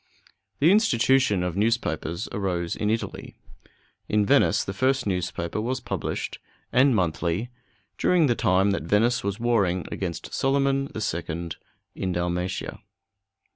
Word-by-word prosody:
The 155 - +5
institution 130 - +3
of 90 -1 -2
newspapers 100 -6 -1
arose 90 -4 -2
in 105 - -1
Italy. 115 +1 -3 0.7
In 105 -1 +2
Venice - - +3
the 100 - -5
first 130 +6 +1
newspaper 90 0 -2
was 125 +3 -2
published, - - -4 0.3
and 130 0 +5
monthly, 90 +4 -1 0.5
during 180 -3 +4
the 125 - +3
time 95 -2 +2
that 100 - -1
Venice 105 +8 +2
was 100 0 -2
warring 100 -7 +1
against 85 -4 -5
Solyman 135 0 +1
the 110 - -4
Second 85 -3 -3 0.4
in 95 -1 -3
Dalmatia. 90 +1 -3
100 Hz, 130 wpm, -25 LUFS, 90-120 Hz, 0.7 s, The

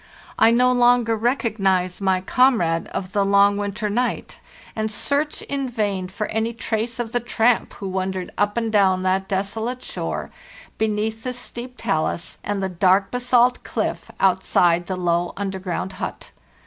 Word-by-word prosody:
I 225 - +7
no 250 +2 +4
longer 245 -2 +4
rec 240 +6 0
ognize 190 -5 0
my 190 -1 +2
comrade 190 -7 +2
of 185 -1 -5
the 200 -1 +2
long 200 +1 +4
winter 205 +1 -2
night, 240 +4 -2 0.4
and 220 0 -1
search 285 +7 -1
in 275 -2 -3
vain 205 -5 -1
for 200 +3 -4
any 220 +1 -1
trace 230 0 -3
of 240 -2 -3
the 245 - +1
tramp 240 0 +1
who 195 - -6
wandered 190 -1 -3
up 205 +2 0
and 230 -1 0
down 190 -3 +3
that 190 +1 +1
desolate 220 +6 -2
shore, - - -4 0.5
beneath 220 +1 -1
the 250 +1 -3
steep 250 0 -8
talus 170 -5 -2
and 200 -1 -2
the - - +1
dark 190 +2 +2
basalt 245 0 +2
cliff, - - -3
outside 175 -2 +3
the 185 - -3
low 175 -1 0
underground 190 -1 -3
hut. - - -6
205 Hz, 160 wpm, -22 LUFS, 190-235 Hz, 0.5 s, I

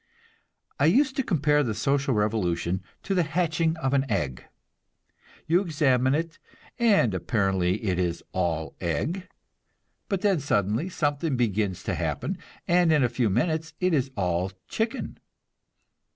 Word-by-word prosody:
I 140 - +4
used 265 - +3
to 270 - +2
compare 150 - +2
the 115 -6 -1
social 135 +3 +1
revolution 95 -4 0 0.2
to 195 - -1
the 180 - +3
hatching 165 0 0
of 135 -3 -1
an 135 -1 +1
egg. 70 - -2 1.0
You 175 +3 +3
examine 140 -7 +2
it, 165 +2 -3 0.4
and 200 - +4
apparently 95 0 0
it 95 -4 0
is 85 -2 -1
all 85 -4 -2
egg; 130 - -2 0.8
but 195 -3 -1
then 200 -5 +2
suddenly 115 - 0
something 145 -4 -1
begins 105 -5 0
to - - -2
happen, - - -2 0.3
and 175 -1 +4
in 150 -3 +4
a 120 - +2
few 120 -1 0
minutes 160 - 0
it 180 -1 +1
is 135 -3 +1
all 90 0 0 0.2
chicken. 225 +4 -3
135 Hz, 140 wpm, -26 LUFS, 100-165 Hz, 1.0 s, I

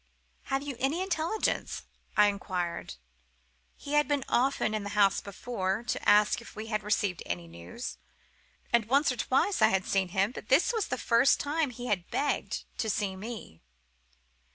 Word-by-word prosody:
"'Have 270 0 -1
you 285 -2 -5
any 275 +6 +1
intelligence?' 375 +3 -1 0.3
I 210 - +8
inquired. 180 - -2 0.8
He 285 - -7
had 295 -1 +4
been 285 -2 0
often 255 -3 +2
to 215 - -1
the 205 -1 -5
house 200 -2 +4
before, 200 0 -3
to 240 - -1
ask 210 +2 +5
if 230 - -13
we 215 - -5
had 215 -1 -1
received 205 -4 0
any 85 -1 -4
news; 85 - -8 0.7
and 235 -2 +4
once 275 +5 +3
or - - -3
twice 270 - +1
I - - +8
had 190 -1 +1
seen 195 -1 +1
him, 195 +4 +1
but 215 - -9
this 290 - +4
was 445 -3 0
the - - -2
first 235 +4 +4
time 295 0 0
he 245 0 -8
had 190 -7 -1
begged 285 - -1 0.2
to 220 - 0
see 195 -2 -1
me. 210 - -8
220 Hz, 175 wpm, -29 LUFS, 195-275 Hz, 0.8 s, I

